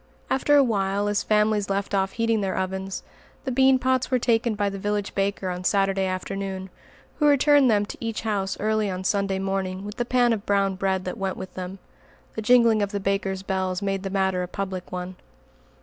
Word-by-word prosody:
After 290 +2 +3
a 280 - +7
while, 200 -3 0
as 205 0 +1
families 210 -1 +2
left 200 +1 -2
off 195 -1 +1
heating 230 -1 +1
their 195 -1 -2
ovens, 190 0 -3 0.4
the 260 - -2
bean 265 +1 +5
pots 260 0 0
were 255 - +3
taken 235 -2 +1
by 205 0 0
the 195 0 -4
village 205 0 -2
baker 195 -1 -1
on 180 0 -5
Saturday 195 0 +2
afternoon, 190 0 -4 0.5
who 300 - +4
returned 285 -1 +5
them 205 -2 +3
to - - -9
each 225 -2 -3
house 195 -4 -2
early 215 -1 +1
on 185 0 -4
Sunday 195 0 0
morning 195 0 -2
with 210 +2 -7
the 240 - +1
pan 245 -1 +3
of 210 -3 -3
brown 200 -1 +1
bread 190 0 -1
that 180 - -5
went 190 -1 -2
with 185 -1 -8
them. 185 +1 -6 0.6
The 220 - -3
jingling 230 -1 +5
of 200 -1 -1
the 200 - -2
baker's 195 -1 -1
bells 190 0 -2
made 195 -1 -1
the 195 - -4
matter 190 -1 0
a 180 - -3
public 190 -1 -5
one. 180 0 -5
195 Hz, 205 wpm, -25 LUFS, 190-220 Hz, 0.6 s, a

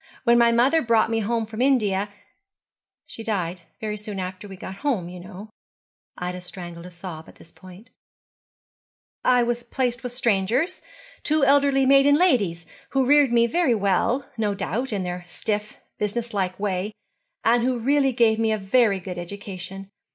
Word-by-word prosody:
When 235 -1 +5
my 235 0 +5
mother 260 +7 +4
brought 230 -1 +2
me 225 - +1
home 225 +1 -1
from 220 +2 -6
India 210 -7 +2 1.0
she 225 - -8
died 185 -5 -2 0.2
very 215 -1 -3
soon 210 -1 -6
after 185 +2 -6
we 195 - -9
got 190 +1 -8
home, 230 -12 -1
you 180 0 -9
know' 195 +3 -10 0.7
Ida 180 0 -4
strangled 175 -1 -7
a - - -9
sob 175 -2 -9
at - - -16
this 165 - -17
point 185 +6 -15 1.3
'I 250 -1 +4
was 240 0 -1
placed 245 0 -2
with 250 - -5
strangers, 245 - 0 0.4
two 305 -2 +2
elderly 275 -1 +4
maiden 275 +1 +6
ladies, 210 - +2 0.2
who 270 -1 +1
reared 285 -1 +5
me 235 -1 +4
very 255 0 +2
well, 205 +6 +1
no 205 -2 0
doubt, 220 +6 -2
in 200 -3 -1
their 180 0 -4
stiff 210 +3 -3 0.2
business 230 +3 -2
like 185 -2 -2
way, 200 0 -2 0.5
and 235 +1 +4
who 255 0 +1
really 270 +3 +2
gave 230 -3 +3
me 225 -1 +2
a 215 - +1
very 200 0 +2
good 180 -1 -6
education. 195 +1 -6
220 Hz, 165 wpm, -24 LUFS, 190-245 Hz, 1.3 s, maiden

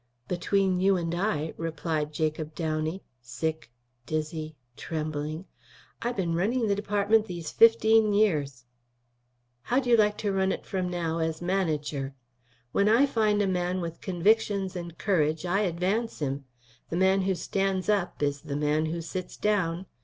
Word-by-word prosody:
"Between 185 +1 +1
you 190 +1 +4
and 170 -1 -2
I," 160 -4 -1
replied 160 -2 -2
Jacob 155 0 -2
Downey, 160 +2 -2 0.2
sick, 160 +5 -4 0.4
dizzy, 155 +1 -3 0.2
trembling, 155 +2 -4 0.6
"I 240 - 0
been 185 -8 -1
running 225 +8 +1
the 205 - +2
department 205 +2 +2
these 170 -5 -5
fifteen 225 -1 +5
years." 150 - +1 1.0
"How'd 250 - 0
you 240 -1 +5
like 210 -2 +3
to 205 - -1
run 190 0 +2
it - - -4
from 185 -2 -2
now 165 -2 -2
as 160 -1 -1
manager? 155 -7 -1 0.6
When 200 +9 +3
I 235 +6 +6
find 215 -5 +2
a - - +1
man 180 0 0
with 170 -2 -5
convictions 195 +1 +1
and 170 -2 -6
courage 160 -4 +1
I 180 +3 +1
advance 195 +4 0
him. 140 -1 -3 0.4
The 170 - -2
man 190 +1 +4
who 190 0 +1
stands 195 0 -1
up 195 -7 0
is 145 0 0
the 150 -3 -5
man 150 +1 +1
to 165 +1 -3
sit 180 +2 -6
down. 190 -4 0
175 Hz, 155 wpm, -28 LUFS, 155-200 Hz, 1.0 s, I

